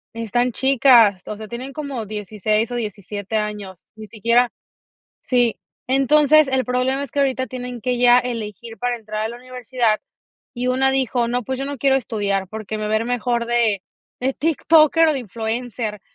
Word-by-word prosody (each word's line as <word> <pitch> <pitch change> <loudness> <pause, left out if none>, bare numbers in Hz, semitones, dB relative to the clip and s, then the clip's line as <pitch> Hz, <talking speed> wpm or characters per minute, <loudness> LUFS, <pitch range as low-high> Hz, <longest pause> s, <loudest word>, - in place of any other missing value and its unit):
Están 240 +2 0
chicas, 245 -7 +5
o 215 - -4
sea, 215 0 -9
tienen 255 +3 -7
como 275 -7 -5
16 215 +2 -2
o - - -3
17 205 -1 -5
años, 210 -4 -4
ni 215 -1 -10
siquiera 235 +3 +2 0.7
sí. 245 -3 +1 0.3
Entonces, 290 +3 +4
el 265 -1 +1
problema 255 +2 0
es 275 - -8
que 285 - -2
ahorita 260 -1 +1
tienen 250 -2 -7
que 250 +1 -1
ya 245 0 +6
elegir 230 -2 -4
para 245 +3 -1
entrar 215 -1 -5
a - - 0
la 235 - -7
universidad, 250 -3 -1 0.5
y 250 0 -3
una 265 +1 +2
dijo: 250 -3 0
"No, 245 0 -1
pues, 260 +3 -3
yo - - -2
no 280 0 -5
quiero 270 +2 +3
estudiar, 200 -6 -1
porque 215 0 -5
me 210 0 -3
va - - 0
a - - +4
ir 225 - -3
mejor 240 -1 -1
de 230 -5 +1 0.4
de 260 +1 0
tiktoker 325 +1 +4
o 310 - +3
de 270 - -2
influencer". 225 -1 -4
240 Hz, 180 wpm, -21 LUFS, 215-260 Hz, 0.7 s, ya